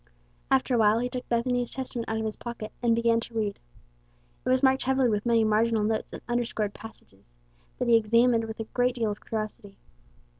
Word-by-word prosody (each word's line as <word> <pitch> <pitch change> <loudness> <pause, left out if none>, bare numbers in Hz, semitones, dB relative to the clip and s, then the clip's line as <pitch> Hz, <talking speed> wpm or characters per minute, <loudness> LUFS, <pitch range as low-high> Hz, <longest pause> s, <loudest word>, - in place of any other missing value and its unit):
After 135 - +2
awhile 220 -2 +4
he 245 +2 -1
took 250 0 -6
Bethany's 245 +1 0
Testament 250 -3 -4
out 220 - -1
of 220 - -2
his 215 - -2
pocket, 230 -3 -7
and 235 -2 +3
began 230 0 +2
to 230 0 -9
read. 210 -2 -2 0.8
It - - -2
was 255 +1 +3
marked 265 0 +4
heavily 265 -1 +2
with 210 +1 -1
many 230 -1 +4
marginal 220 0 +2
notes 215 +1 -1
and - - -9
underscored 235 -4 -1
passages, 95 - -14 0.4
that 250 - -2
he 235 - +6
examined 230 +1 +3
with 220 0 -8
a - - -1
great 245 +3 0
deal 225 -3 0
of 205 - -8
curiosity. 215 -2 -5
230 Hz, 195 wpm, -27 LUFS, 215-245 Hz, 0.8 s, he